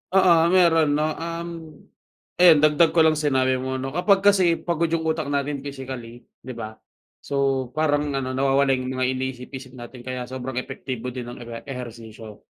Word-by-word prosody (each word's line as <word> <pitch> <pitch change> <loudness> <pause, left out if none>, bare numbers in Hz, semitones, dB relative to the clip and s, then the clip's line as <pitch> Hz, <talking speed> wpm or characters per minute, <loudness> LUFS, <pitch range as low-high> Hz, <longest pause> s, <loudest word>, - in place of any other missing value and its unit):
Oo, 185 -3 +6
meron 165 -5 +4
'no, 150 - +1 0.2
um, 170 +1 -5 0.9
ayan 165 -4 +7
dagdag 155 +2 +4
ko 165 - +6
lang 155 -1 +3
sa 150 - 0
sinabi 130 -2 +2
mo 130 +1 -3
'no, 130 +1 -4
kapag 190 +4 +2
kasi 190 -4 +4
pagod 170 0 -1
yung 165 0 -1
utak 160 -2 -1
natin 145 0 -1
physically, 130 -4 -8 0.2
'di 130 -1 -9
ba? 110 -1 -8 0.4
So, 135 -2 -1
parang 150 -1 +1
ano, 130 -1 -2
nawawala 135 +1 +2
yung 130 0 -2
mga 130 - -1
iniisip-isip 130 0 -4
natin 120 +1 -10
kaya 130 -1 -4
sobrang 130 0 -6
epektibo 125 -1 -5
din 120 -1 -7
ng 120 0 -8
ewe 115 0 -7
ehersisyo. 115 -4 -9
135 Hz, 170 wpm, -23 LUFS, 125-155 Hz, 0.9 s, ayan